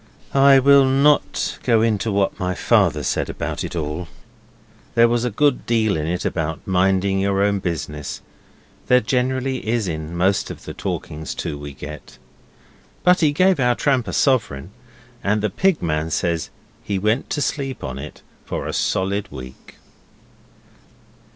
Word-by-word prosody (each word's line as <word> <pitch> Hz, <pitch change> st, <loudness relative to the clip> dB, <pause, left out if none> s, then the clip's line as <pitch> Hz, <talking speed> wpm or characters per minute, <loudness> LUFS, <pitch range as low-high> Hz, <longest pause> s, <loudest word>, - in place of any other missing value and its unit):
I 140 Hz, 0 st, +7 dB
will 140 Hz, +1 st, +6 dB
not 140 Hz, +3 st, +2 dB
go 115 Hz, -3 st, +3 dB
into 110 Hz, -1 st, 0 dB
what 100 Hz, -1 st, 0 dB
my 90 Hz, 0 st, -1 dB
father -, -, +2 dB
said -, -, -1 dB
about -, -, -4 dB
it -, -, -5 dB
all. 80 Hz, +2 st, -3 dB, 0.9 s
There 115 Hz, 0 st, +6 dB
was 120 Hz, 0 st, 0 dB
a -, -, +1 dB
good 140 Hz, +4 st, +1 dB
deal 110 Hz, -3 st, +2 dB
in 75 Hz, 0 st, -2 dB
it 90 Hz, +2 st, -2 dB
about 80 Hz, -1 st, -3 dB
minding 95 Hz, +1 st, +2 dB
your 100 Hz, 0 st, +1 dB
own 100 Hz, -1 st, +1 dB
business 75 Hz, -5 st, -4 dB, 0.7 s
there 125 Hz, -, +6 dB
generally 130 Hz, +2 st, -1 dB
is 115 Hz, -3 st, 0 dB
in 80 Hz, 0 st, -5 dB
most 95 Hz, +3 st, +1 dB
of -, -, -9 dB
the -, -, -6 dB
talkings 75 Hz, +1 st, -5 dB
to -, -, -4 dB
we 70 Hz, 0 st, -8 dB
get. 70 Hz, -2 st, -10 dB, 0.9 s
But 180 Hz, 0 st, +5 dB
he 155 Hz, -3 st, +3 dB
gave 185 Hz, +3 st, +3 dB
our 125 Hz, -2 st, +3 dB
tramp 130 Hz, -5 st, +1 dB
a 90 Hz, -, -4 dB
sovereign, 105 Hz, -, +1 dB, 0.5 s
and 105 Hz, +1 st, +1 dB
the 105 Hz, -, 0 dB
Pig 190 Hz, -, +1 dB
man 80 Hz, -1 st, -1 dB
says 85 Hz, 0 st, -1 dB, 0.3 s
he 100 Hz, -, -2 dB
went 105 Hz, +7 st, 0 dB
to -, -, -2 dB
sleep 135 Hz, -2 st, -3 dB
on 65 Hz, 0 st, -5 dB
it 75 Hz, +2 st, -10 dB, 0.2 s
for -, -, -4 dB
a -, -, -4 dB
solid 100 Hz, +2 st, -1 dB
week. 65 Hz, -1 st, -11 dB
100 Hz, 160 wpm, -21 LUFS, 85-125 Hz, 0.9 s, I